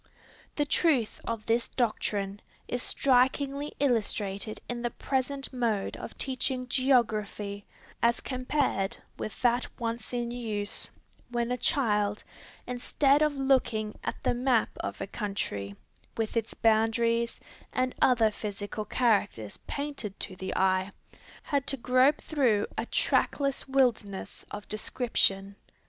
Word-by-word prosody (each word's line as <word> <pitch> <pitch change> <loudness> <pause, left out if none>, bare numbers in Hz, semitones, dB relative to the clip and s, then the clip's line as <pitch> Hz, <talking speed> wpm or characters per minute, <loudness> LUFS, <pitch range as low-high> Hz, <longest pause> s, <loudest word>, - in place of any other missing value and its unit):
The 295 - +1
truth 285 -7 +2
of 230 -2 -3
this 230 +1 +1
doctrine 205 -4 -1 0.3
is 245 - -1
strikingly 275 +3 +2
illustrated 215 -5 0
in 240 -1 -3
the 240 - 0
present 270 +2 -2
mode 230 -5 0
of - - -8
teaching 255 -1 -1
geography, 215 -6 +1 0.3
as 235 0 +3
compared 255 -5 -1 0.2
with 215 - -5
that 245 0 +3
once 230 -1 -3
in 240 -1 -2
use, 215 -4 -2 0.4
when 240 0 -1
a - - +2
child, 210 -7 +1 0.4
instead 275 +3 +2
of 300 -1 +3
looking 255 -6 +1
at - - -2
the - - +2
map 245 -1 +2
of - - -4
a - - -1
country, 105 - -3 0.4
with 225 0 -1
its 230 -1 -1
boundaries 230 +1 +2 0.3
and 255 0 0
other 230 -4 +5
physical 205 0 -4
characters 205 - +1
painted 280 -9 -4
to 190 - -4
the 190 +1 -4
eye, 185 0 +2 0.5
had 280 -2 -1
to 275 - +3
grope 255 +4 +4
through 245 -9 +2
a 230 - -2
trackless 275 -2 +1
wilderness 240 -7 0
of 205 0 -7
description. 200 -3 +1
235 Hz, 125 wpm, -29 LUFS, 210-260 Hz, 0.5 s, other